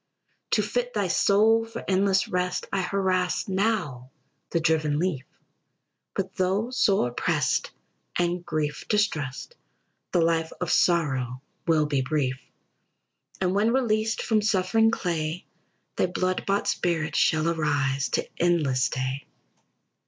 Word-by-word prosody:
"To - - +2
fit - - -2
thy - - 0
soul 220 +3 +4
for 225 0 -8
endless 195 0 +2
rest, 180 0 -1
I 195 - +1
harass 185 -1 0
now 190 - -1 0.4
the 170 - 0
driven 155 -2 +1
leaf, 160 -5 -1 0.9
But 190 -1 -3
though 195 +5 0
sore 195 - +2
pressed - - 0 0.5
and 175 0 0
grief 150 -3 -3
distressed, 205 - -1 0.6
The 175 - +3
life 165 -1 +1
of 180 - -2
sorrow 135 -7 +1 0.2
will 160 -2 +3
be 145 -3 0
brief. 130 -2 -1 1.0
"And 185 -1 +1
when 210 +3 +2
released 225 -3 +1
from 220 -2 +2
suffering 215 +2 +2
clay, 170 -5 -2 0.5
Thy - - +2
blood 185 +1 -2
bought 200 +1 +1
spirit 165 -5 -1
shall 160 0 +3
arise 145 -4 0
To - - 0
endless 150 -7 +2
day. 130 +1 -3
175 Hz, 125 wpm, -26 LUFS, 150-200 Hz, 1.0 s, soul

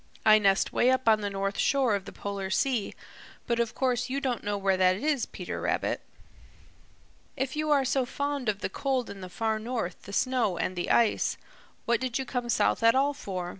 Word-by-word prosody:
I 215 0 +7
nest 195 -2 +2
'way 245 - +3
up 260 -1 +1
on 215 -1 +5
the 195 -1 -2
shore 270 -5 +2
of 200 -2 -2
the - - -8
Polar 200 -1 -5
Sea, 235 +2 0 0.5
but 235 -1 0
of 235 -1 -1
course 250 -1 0
you 270 +2 -1
don't 255 -4 -2
know 205 0 -1
where 195 -1 +2
that 185 0 +4
is, 285 +4 0
Peter - - -6
Rabbit." - - -1 1.4
"If 265 +1 -2
you 305 0 -1
are 280 -2 +3
so 260 -1 +1
fond 285 -3 -2
of 205 -1 -2
the - - -2
cold 260 +3 -2
in 195 - -10
the 185 - -7
Far 220 +3 -1
North, 220 -6 -4
the 200 - -11
snow 245 -7 +1
and 185 - -2
the 175 - -3
ice, 230 -2 +2 0.5
what 235 -1 +2
did 255 -2 -1
you 265 - -3
come 245 -2 -3
south - - +2
at 230 +1 +5
all 280 +2 +2
for? 185 -10 -5
235 Hz, 205 wpm, -28 LUFS, 200-260 Hz, 1.4 s, I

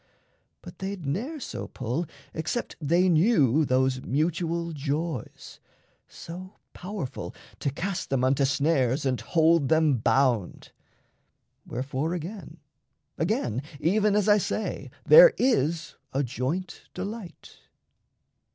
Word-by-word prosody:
But - - -12
they'd 195 -3 -5
ne'er 235 - -3
So - - -6
pull, 130 +7 -3 0.3
except 160 +9 -3
they 170 +5 +3
knew 160 - +4
those 130 0 +1
mutual 170 +4 -1
joys 150 -2 -4 0.5
So 185 +4 -10 0.2
powerful 180 -8 -6 0.2
to - - 0
cast 185 +7 -4
them 135 -2 0
unto 135 +2 +2
snares 140 -1 +1
And 130 -2 0
hold 165 -3 +3
them 155 -4 +3
bound. 120 -4 +1 1.0
Wherefore 135 +6 -2
again, 180 +4 -7 0.6
again, 120 +1 0 0.2
Even 205 +5 +2
as 210 -1 +2
I 210 0 +6
say, 215 - -3 0.2
there - - +9
is 165 - 0 0.2
a 140 +2 +1
joint 135 +9 -4
delight. 200 -1 -7
160 Hz, 110 wpm, -26 LUFS, 135-185 Hz, 1.0 s, there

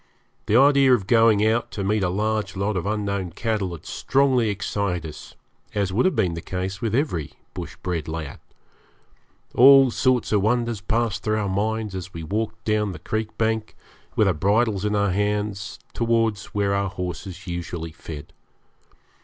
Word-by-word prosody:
The 105 - +2
idea 135 -1 +6
of 100 -6 -4
going 115 -2 +4
out 115 +2 +1
to 100 - -3
meet 105 +2 +1
a 90 - +1
large 105 0 -1
lot 100 +2 0
of 95 +1 -2
unknown 100 -4 -2
cattle 105 -3 -1
had 80 - -10
strongly 130 -4 +2
excited 100 -4 -2
us, 75 - -11 0.4
as 100 -2 0
would 120 - +3
have 185 - 0
been 95 -7 +1
the 85 - -5
case 95 +2 -4
with 115 -1 0
every 120 - -1 0.2
bush - - -7
bred 85 -4 -2
lad. 80 -3 -5 1.1
All 135 0 +8
sorts 130 -1 +1
of 105 -2 +3
wonders 115 0 0
passed 110 -3 0
through 110 0 0
our 105 -2 -1
minds 105 +2 -1
as 95 -1 -7
we 80 - -5
walked 105 +7 -3
down 105 -2 +1
the - - -7
creek 110 +6 -4
bank, 110 -1 -1 0.4
with 105 - +4
our 95 - +3
bridles 100 +4 +1
in 105 0 +1
our 100 -1 +2
hands, 105 0 -1 0.2
towards 115 -3 +1
where 100 -1 -1
our 100 0 0
horses 90 0 -6
usually 85 -2 -5
fed. 80 -2 -9
105 Hz, 170 wpm, -24 LUFS, 95-110 Hz, 1.1 s, All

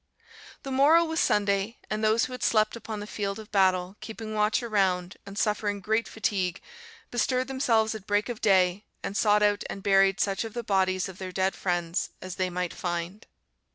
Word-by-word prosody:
"The 270 - -5
morrow 300 +6 +5
was 320 0 -2
Sunday; 200 +2 +1
and 215 +1 -3
those 220 +1 +3
who - - -9
had 250 - -7
slept 215 0 +2
upon 220 -2 -6
the - - -5
field 200 -1 -3
of 220 -1 -11
battle, 185 -1 +2
keeping 220 -1 -7
watch 215 +3 +1
around, 190 -5 0
and 200 0 -9
suffering 210 -1 0
great 220 +3 0
fatigue, 190 -4 -1 0.5
bestirred 255 +2 0
themselves 230 -5 +1
at 215 -2 -9
break 205 0 +1
of 240 -3 -5
day 190 0 +3 0.2
and 195 - -4
sought 210 -1 +3
out 205 0 +2
and 195 - -6
buried 195 -1 +4
such 195 +1 0
of 225 -1 -8
the 240 - -3
bodies 190 -2 +1
of 185 -1 -10
their 185 -1 -5
dead 190 +1 0
friends 175 -1 -1
as 185 -1 -7
they 185 -1 0
might 180 -1 -3
find. 175 +4 -4
205 Hz, 190 wpm, -27 LUFS, 190-220 Hz, 0.5 s, morrow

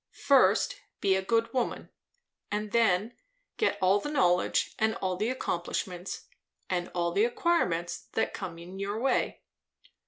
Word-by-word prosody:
First, - - +4 0.2
be 195 -1 +3
a 190 - +1
good 230 +5 +1
woman; 250 -2 -2 0.6
and 210 0 -2
then, 225 -1 +2 0.4
get 430 - +1
all 190 +2 +4
the 295 - -4
knowledge 180 -11 +2
and 220 0 +2
all 185 -1 -1
the 210 +5 -1
accomplishments, 180 -5 -3 0.5
and 175 -1 -1
all 170 -1 +1
the 200 +5 +2
acquirements, 235 - 0
that - - 0
come 180 -4 -6
in 180 +3 -9
your 200 +2 -2
way. 270 +3 0
200 Hz, 145 wpm, -29 LUFS, 180-230 Hz, 0.6 s, First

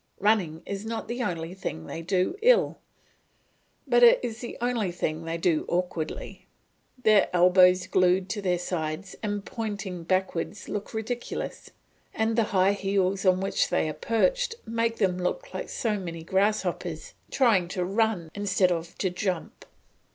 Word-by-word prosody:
Running 185 -6 +1
is 200 0 -5
not 225 +1 -4
the 240 +2 -3
only 170 -5 -3
thing 80 - -5
they 165 - -6
do 185 - 0
ill, 485 +1 +4 1.1
but 485 - +3
it 485 +1 +8
is 225 -1 -4
the 240 - -6
only 235 -6 0
thing 165 -2 -3
they 165 0 -2
do 165 -2 +1
awkwardly; 175 -3 -3 0.6
their 215 -2 +5
elbows 180 +1 +5
glued 185 0 +2
to 205 +2 -3
their 180 -2 +1
sides 175 +1 -4
and 205 -2 -3
pointed 200 -6 -5
backwards 190 +1 -1
look 210 +1 -5
ridiculous, 235 +2 -4 0.5
and 220 0 +1
the 230 -1 +3
high 195 0 +3
heels 195 -1 0
on 185 0 +4
which 195 - 0
they - - +1
are 155 - -3
perched - - +1
make 230 0 0
them 190 -5 +1
look - - -3
like - - -5
so 215 -4 -1
many 165 -3 -6
grasshoppers 210 - -1 0.2
trying 220 -10 +3
to 180 0 -2
run 195 -4 0
instead 195 -2 +2
of 165 -1 -3
to 185 - 0
jump. 180 -2 -3
195 Hz, 155 wpm, -27 LUFS, 180-220 Hz, 1.1 s, it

